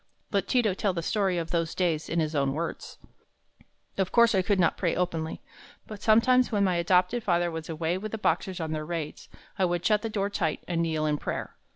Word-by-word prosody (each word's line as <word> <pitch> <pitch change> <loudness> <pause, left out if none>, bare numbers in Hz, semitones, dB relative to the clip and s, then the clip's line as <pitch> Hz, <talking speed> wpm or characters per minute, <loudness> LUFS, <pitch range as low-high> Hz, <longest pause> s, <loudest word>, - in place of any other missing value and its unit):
Let 200 -1 0
Ti 250 -1 +3
to 210 -4 +1
tell 195 0 0
the 170 -1 -3
story 195 -1 0
of 165 -1 -3
those 165 -1 -1
days 165 -4 0
in 170 - 0
his 155 -1 -1
own 140 -2 +1
words: 165 +3 -5 1.0
"Of 190 -1 0
course 235 -1 +5
I 190 - +3
could 195 +1 +1
not 170 - +3
pray 175 -3 0
openly. 165 -2 -2 0.4
But 210 -2 -9
sometimes 245 +4 +4
when 205 -2 +2
my 185 -3 +2
adopted 180 +6 +2
father 175 -2 +1
was 160 0 -6
away 165 +3 -1
with 215 +1 -6
the 220 - -3
Boxers 190 -3 -1
on 160 -1 -3
their 155 -1 -2
raids, 160 -2 -5 0.3
I 190 - +4
would 175 -1 -1
shut 210 -1 +3
the 225 - -3
door 200 -1 -1
tight 160 -6 -1
and 170 -2 0
kneel 160 -2 0
in 150 -1 0
prayer. - - -4
180 Hz, 225 wpm, -27 LUFS, 165-205 Hz, 1.0 s, course